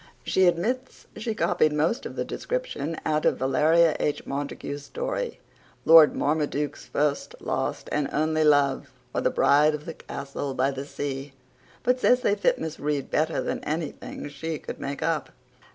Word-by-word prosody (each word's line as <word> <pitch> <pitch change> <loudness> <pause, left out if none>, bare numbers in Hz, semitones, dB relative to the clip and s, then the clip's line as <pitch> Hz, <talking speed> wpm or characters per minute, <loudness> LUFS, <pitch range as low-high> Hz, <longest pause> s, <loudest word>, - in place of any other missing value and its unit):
She 190 -1 +3
admits 235 +10 -1
she 220 0 -3
copied 155 -7 +2
most 160 +10 0
of - - -10
the - - -2
description 325 - -3
out 155 0 +1
of - - +2
Valeria 155 +5 +3
H. 150 - -1
Montague's 140 0 -4
story - - -4 0.5
Lord 160 -2 +8
Marmaduke's 145 -1 -1
First, 145 -1 -1
Last, - - -2
and 150 -2 0
Only 155 +1 +1
Love; 145 -2 +3 0.2
or - - 0
the - - +2
Bride 150 +2 +4
of 150 0 -9
the 165 - -5
Castle 140 -1 -6
by 135 +2 +2
the 135 +1 -5
Sea, 140 -1 -5 0.5
but 250 +1 +2
says 250 0 +4
they 205 - +2
fit 205 - +2
Miss 160 -1 -5
Reade 145 -2 -2
better 155 -2 +1
than - - -3
anything 155 -1 -4
she 155 +3 -4
could - - -8
make 140 0 -4
up. 165 -3 0
150 Hz, 165 wpm, -26 LUFS, 145-170 Hz, 0.5 s, Lord